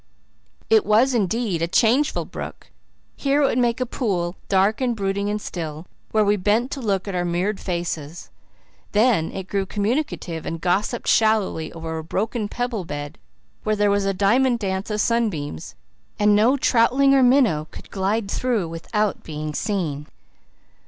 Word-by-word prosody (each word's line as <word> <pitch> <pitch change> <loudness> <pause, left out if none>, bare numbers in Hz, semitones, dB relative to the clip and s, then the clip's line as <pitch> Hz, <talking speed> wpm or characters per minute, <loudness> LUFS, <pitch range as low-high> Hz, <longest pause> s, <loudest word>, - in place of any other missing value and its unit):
It 445 -1 +5
was 235 +5 +3
indeed 215 -4 0
a 165 - +1
changeful 230 - +2
brook; - - -8 0.4
here 285 +1 +1
it - - +5
would 255 - +1
make 240 0 +1
a 255 - 0
pool, 190 -8 -2
dark 200 +5 +2
and 245 -2 +1
brooding 200 0 -1
and 210 0 -1
still, 160 -4 -6 0.2
where 215 -1 +2
we 205 +1 +3
bent 215 +7 +1
to 275 - -4
look 200 -4 -1
at 200 - -3
our 180 -1 0
mirrored 180 +4 -1
faces; 170 -3 -4 0.6
then 215 -6 +3
it 190 -1 -6
grew 195 -1 -1
communicative 205 - -2
and 165 - -4
gossiped 195 +7 -1
shallowly 215 -8 +2
over 160 -1 -5
a - - -6
broken 215 +6 -2
pebble 245 -4 -3
bed 145 -2 -6 0.4
where 215 0 0
there 205 -1 +2
was 200 0 +1
a 195 - +2
diamond 235 +6 +2
dance 190 -2 -3
of 210 0 -2
sunbeams 195 - -1 0.4
and 210 0 +4
no 235 +7 +4
troutling 260 +2 +3
or 270 - +5
minnow 245 - +3
could - - -12
glide 200 +2 -1
through 235 -8 0
without 205 +5 -2
being 155 -1 -5
seen. 155 -7 -2
205 Hz, 165 wpm, -22 LUFS, 175-235 Hz, 0.6 s, It